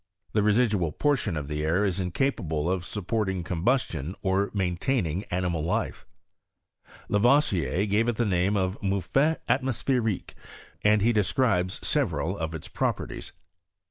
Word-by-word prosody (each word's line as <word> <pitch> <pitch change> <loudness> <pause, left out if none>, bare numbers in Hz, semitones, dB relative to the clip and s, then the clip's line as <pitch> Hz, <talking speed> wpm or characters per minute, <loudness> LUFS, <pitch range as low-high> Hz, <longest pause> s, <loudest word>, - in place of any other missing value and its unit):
The 105 - +3
residual 105 -5 +2
portion 125 - 0
of 70 -2 -4
the 75 0 -3
air 85 +6 +2
is 95 -2 -1
incapable 90 - -1
of 95 -2 -1
sup 95 +3 -5
porting 95 -5 -1
combustion 85 - -1
or 95 +1 +1
maintaining 95 - -1
animal 90 -3 -1
life. 85 - -2 1.1
Ia 105 - +3
" 130 +5 +6
T 90 - 0
gave 105 +3 +2
it 120 - 0
the 120 - +1
name 95 +1 +1
of 95 +1 -1
mouffette 100 - +1
almospheriquMy 125 -5 0 0.5
and 105 -1 +4
he 120 +2 +4
describes 105 -3 +1
several 90 +4 0
of 80 -2 -4
its 80 - -7
properties. - - -3
95 Hz, 140 wpm, -27 LUFS, 85-115 Hz, 1.1 s, "